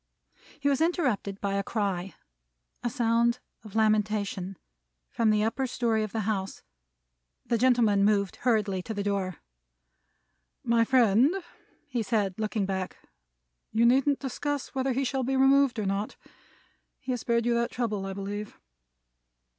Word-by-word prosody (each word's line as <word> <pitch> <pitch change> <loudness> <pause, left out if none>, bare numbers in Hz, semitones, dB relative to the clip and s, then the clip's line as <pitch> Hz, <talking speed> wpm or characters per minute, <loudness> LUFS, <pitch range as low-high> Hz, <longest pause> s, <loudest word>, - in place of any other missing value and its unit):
He 285 - -1
was 280 +1 +2
interrupted 255 - 0
by 200 -1 -2
a 200 - +1
cry 195 -4 -2 0.7
a 240 - -1
sound 235 -1 +2 0.3
of 215 -2 -12
lamentation 210 -3 0 0.5
from 230 -2 +2
the 210 0 +3
upper 260 +4 0
story 235 -3 0
of 215 -2 -3
the 225 - -2
house. 195 -2 -3 0.8
The 235 - 0
gentleman 235 -5 +4
moved 200 -2 +2
hurriedly 215 -6 +1
to 220 +4 -6
the 200 - -2
door. 195 -3 -1 1.3
"My 235 -1 +3
friend," 245 +1 +4 0.6
he 250 -5 -2
said, 205 -3 -1
looking 215 -1 -1
back, 190 -1 -3 0.7
"you 225 +2 +3
needn't 270 +3 +4
discuss 285 +1 -3
whether 265 -1 0
he 270 +3 0
shall 265 0 -1
be 265 +1 0
removed 270 -1 +4
or 215 - -1
not. 195 +2 -2 0.8
He 265 -2 -5
has 245 -2 -2
spared 235 -1 +1
you 240 - +2
that 235 0 +1
trouble, 215 -5 -2
I 195 - -4
believe." 205 +2 -6
220 Hz, 145 wpm, -28 LUFS, 200-250 Hz, 1.3 s, gentleman